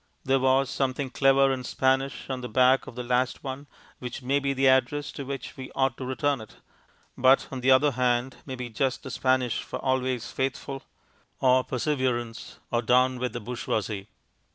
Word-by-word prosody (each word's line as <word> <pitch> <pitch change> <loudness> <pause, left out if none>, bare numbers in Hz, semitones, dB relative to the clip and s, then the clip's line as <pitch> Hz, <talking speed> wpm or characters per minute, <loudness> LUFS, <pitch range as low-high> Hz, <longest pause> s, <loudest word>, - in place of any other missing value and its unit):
There 135 0 +2
was 130 +1 +3
something 135 0 -1
clever 135 0 +4
in 130 -1 -4
Spanish 135 +2 0
on 130 -2 -4
the 125 - -6
back 130 +1 +4
of - - -9
the 125 - -4
last 125 +1 0
one, 135 +2 -6 0.3
which 125 +1 -6
may 135 +3 +2
be 140 0 -1
the 135 0 +2
address 130 +3 +2
to 140 - -6
which 140 -1 -6
we 130 -1 -8
ought 135 -2 +1
to 130 - -5
return 135 0 0
it, 110 - -13 0.6
but 130 +2 +4
on 130 -2 -5
the 130 - +2
other 135 +3 +5
hand, 125 0 0
may 130 - -6
be 125 -1 -5
just 130 +3 -1
the 135 - -7
Spanish 130 -2 +1
for - - -6
"Always 130 -3 -1
faithful" 135 0 -3 0.6
or 130 0 +4
"Perseverance" 125 -4 -2
or 120 - +1
"Down 125 +2 +3
with 125 0 -2
the 120 - -3
bourgeoisie." 110 -3 -3
130 Hz, 185 wpm, -27 LUFS, 125-135 Hz, 0.6 s, other